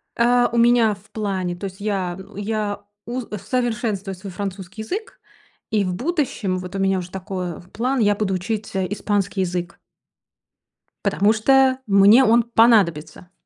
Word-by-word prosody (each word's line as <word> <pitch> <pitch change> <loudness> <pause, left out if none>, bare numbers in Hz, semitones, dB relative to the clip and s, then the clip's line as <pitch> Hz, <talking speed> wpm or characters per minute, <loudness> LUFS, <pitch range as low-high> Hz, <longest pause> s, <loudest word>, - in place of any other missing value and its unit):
Э, 245 +1 +3
у 235 - -1
меня 235 -2 +4
в 200 +2 -23
плане, 190 -4 -2
то 180 - -7
есть 190 0 -7
я 195 -4 -2 0.2
я 205 0 -3 0.2
у 245 +2 -3 0.2
совершенствую 220 -2 -2
свой 190 +2 -9
французский 195 +1 -6
язык. 425 - -6 0.5
И 210 -2 +2
в 180 - -2
будущем 250 - -1
вот 180 +1 -8
у - - -2
меня 195 0 +2
уже 180 0 -8
такое, 185 -3 -5
план, 255 +4 0
я 205 -2 +3
буду 200 -2 -1
учить, 210 +3 -4
э, 190 -1 0
испанский 200 -1 -1
язык. 175 -1 -3 1.3
Потому 205 +2 +3
что 265 +3 +3
мне 200 +5 +6
он 235 +1 +4
понадобится. 190 -8 +2
205 Hz, 150 wpm, -21 LUFS, 190-230 Hz, 1.3 s, мне